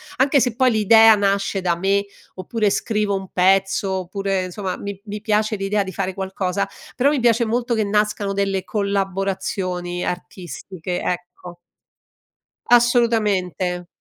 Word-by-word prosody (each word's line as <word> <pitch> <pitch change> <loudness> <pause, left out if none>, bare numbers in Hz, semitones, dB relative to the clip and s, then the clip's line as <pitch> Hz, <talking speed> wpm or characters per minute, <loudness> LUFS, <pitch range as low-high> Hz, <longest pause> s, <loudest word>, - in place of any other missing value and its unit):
Anche 275 +2 +3
se 240 -2 0
poi 255 -1 +3
l'idea 220 +1 +6
nasce 200 -1 0
da 175 -2 +1
me, 195 +2 +1 0.3
oppure 205 +2 -1
scrivo 210 -2 0
un 190 -1 -5
pezzo, 195 +1 +2
oppure 190 +1 -2
insomma, 185 +1 -4
mi 200 -1 -6
mi 210 0 -6
piace 215 0 +1
l'idea 200 +1 0
di 190 - -7
fare 190 -1 -2
qualcosa, 190 0 -2 0.3
però 265 +3 +3
mi 295 - +1
piace 235 -1 +3
molto 240 +2 -1
che 220 -2 +1
nascano 210 -1 0
delle 195 -1 -1
collaborazioni 190 -3 -2
artistiche, 180 0 -5
ecco. 180 0 -5 1.1
Assolutamente. 210 -7 +2
195 Hz, 135 wpm, -21 LUFS, 185-215 Hz, 1.1 s, l'idea